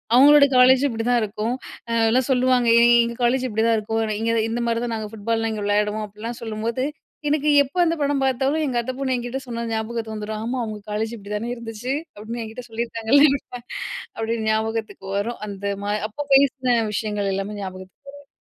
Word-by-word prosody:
அவங்களோட 285 +2 +8
காலேஜ் 255 +1 +6
இப்படிதான் 240 +1 +1
இருக்கும். 215 +3 -2 0.6
எல்லாம் 250 +2 +2
சொல்லுவாங்க 255 -1 +3 0.4
எங்க 235 0 -3
காலேஜ் 255 +2 +2
இப்படிதான் 225 +1 +2
இருக்கும். 220 +1 -2 0.2
இங்கே 225 +1 0
இந் 220 - +1
இந்த 240 +1 -2
மாதிரி 230 0 0
தான் 235 - -3
நாங்க 215 -1 -4
ஃபுட்பாலலாம் 225 +1 -1
இங்கே 210 -1 -4
விளையாடுவோம். 210 +1 +1
அப்படிலாம் 225 +4 -7
சொல்லும்போது 225 +3 -2 0.5
எனக்கு 300 0 +1 0.2
எப்போ 280 +6 -11
அந்த 330 - +1
படம் 285 -1 +1
பார்த்தாலும் 270 +4 +1
எங்க 250 -3 -1
அத்தை 255 +2 -4
பொண்ணு 270 -1 -1
என்கிட்டே 245 +2 -3
சொன்னது 235 -1 -4
ஞாபகத்துக்கு 220 0 -3
வந்துரும். 215 0 -4
ஆமா! 245 +3 -2
அவங்க 215 -2 -5
காலேஜ் 220 +2 -1
இப்படி 200 -1 -11
தானே 230 +3 -3
இருந்துச்சு 235 +2 -5 0.2
அப்படின்னு 220 +3 -6
என்கிட்டே 225 +3 -8
சொல்லியிருக்காங்கள்ல. 230 +4 +2 0.9
அப்படியே 225 +1 -2
ஞாபகத்துக்கு 220 -2 -2
வரும். 230 +4 -2
அந்த 200 -1 -8 0.2
மாதிரி 210 +1 -1
அப்போ 290 +7 -5
பேசின 265 -2 +3 0.2
விஷயங்கள் 205 -1 -1
எல்லாமே 195 +2 -3
ஞாபகத்துக்கு 185 +5 -9
வரும். 285 0 -15
230 Hz, 175 wpm, -23 LUFS, 215-250 Hz, 0.9 s, அவங்களோட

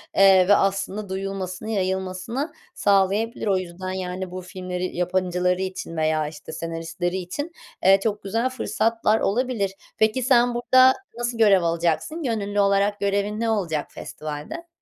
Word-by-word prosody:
eee, 190 -2 +6
ve 205 - +7
aslında 195 +1 -1
duyulmasını, 195 +1 -4
yayılmasını 190 - -2 0.2
sağlayabilir. 205 +4 +1
O 195 -2 +3
yüzden, 185 +1 -5
yani, 185 0 -4
bu 185 0 -5
filmleri, 180 0 -5
yapımcıları 180 0 0
için 185 -3 -5
veya, 155 -1 +1
işte, 150 0 -9
senaristleri 165 +2 -3
için, 190 - -5 0.3
eee, 195 +1 +6
çok 210 -2 -1
güzel 225 +6 0
fırsatlar 225 -3 +1
olabilir. 225 -2 0 0.3
Peki, 220 +3 +2
sen 245 -1 +4
burada 255 +2 +6 0.2
nasıl 240 -1 -2
görev 200 -5 +5
alacaksın? 170 - 0
Gönüllü 205 -4 -1
olarak 200 +1 +2
görevin 200 +1 0
ne 230 0 0
olacak 170 -9 -1
festivalde? 155 - -7
195 Hz, 140 wpm, -24 LUFS, 180-220 Hz, 0.3 s, ve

